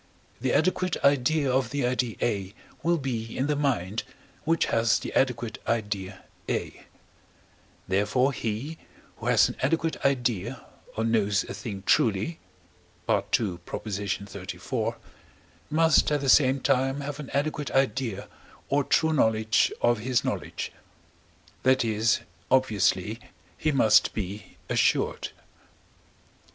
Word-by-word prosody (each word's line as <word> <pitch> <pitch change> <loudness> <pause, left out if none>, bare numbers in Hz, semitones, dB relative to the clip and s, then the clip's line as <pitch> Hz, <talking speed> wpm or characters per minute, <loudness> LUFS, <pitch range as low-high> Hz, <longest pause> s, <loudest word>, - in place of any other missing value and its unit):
the 130 +1 0
adequate 185 +1 +1
idea 140 +1 +3
of 130 -1 +1
the 140 -2 -1
idea 125 -2 0
A 100 -3 -1 0.3
will 170 +1 +2
be 115 -6 -4
in 130 - +1
the 150 0 +1
mind, 120 -8 0 0.4
which 165 +1 +2
has 115 0 +2
the - - -6
adequate 120 -3 0
idea 100 -4 -2 0.3
A; - - -3 1.0
therefore 105 +8 +2
he, 125 +9 -4 0.4
who - - -6
has - - +5
an - - -7
adequate 165 +4 0
idea 125 -7 0 0.3
or 110 - 0
knows 105 -3 +2
a - - -7
thing 100 -1 -6
truly 110 - +2 0.7
(II. 100 -7 +1
xxxiv.), 100 -2 -4 0.7
must 160 -1 +4
at 145 - +2
the 135 - 0
same 135 -1 +5
time 135 +3 +1
have 145 +1 -5
an 150 - -7
adequate 145 -1 -1
idea 130 -5 0 0.4
or 145 +1 +2
true 160 +3 +2
knowledge 110 -5 +3
of 120 -2 +3
his 125 +2 0
knowledge; - - -3 0.9
that 130 -1 +3
is, 110 +1 +2 0.3
obviously, 105 -4 +2 0.4
he 155 - 0
must 135 -6 +4
be 105 0 -6
assured. - - +1
125 Hz, 120 wpm, -27 LUFS, 105-140 Hz, 1.0 s, has